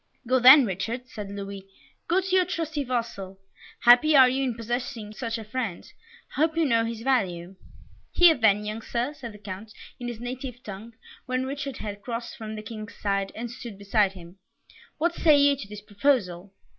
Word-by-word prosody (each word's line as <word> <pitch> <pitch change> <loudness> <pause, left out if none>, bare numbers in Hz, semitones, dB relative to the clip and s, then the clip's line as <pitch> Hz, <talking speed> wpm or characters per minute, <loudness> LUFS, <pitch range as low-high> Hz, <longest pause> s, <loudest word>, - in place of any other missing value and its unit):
"Go 255 +2 +2
then, 260 +2 +9
Richard," 225 +6 -3
said 210 -3 -7
Louis, 200 -1 -7 0.4
"go 365 +3 +2
to 375 0 -1
your 370 - +5
trusty 320 -4 -3
vassal 230 -7 -4 0.4
happy 245 +6 +6
are 260 -2 +9
you 265 +2 0
in 250 -3 -1
possessing 235 -1 -4
such 230 0 -4
a 225 - -7
friend; 220 -4 -4 0.5
I - - -1
hope 320 +1 +2
you 330 - +3
know 230 -4 +2
his 230 -1 -5
value." 190 -8 0 0.6
"Here 350 -2 +7
then, 210 -5 +2
young 215 +2 -4
Sir," 240 +5 -2
said 240 -6 -8
the 210 - -12
Count, 205 +1 -8 0.3
in 245 - -5
his 240 -2 -6
native 250 0 -6
tongue, 215 +3 -9 0.3
when 255 0 -1
Richard 275 -1 -5
had 205 -1 -6
crossed 235 +1 -5
from 220 -1 -7
the 215 - -7
King's 215 -1 -8
side, 195 -1 -1
and 235 +1 -5
stood 235 -4 -9
beside 200 0 +1
him, 180 0 -13 0.6
"what 340 +2 +1
say 310 -3 +4
you 285 0 +5
to 235 -7 -9
this 210 0 -9
proposal?" 205 -4 0
230 Hz, 190 wpm, -26 LUFS, 205-260 Hz, 0.6 s, then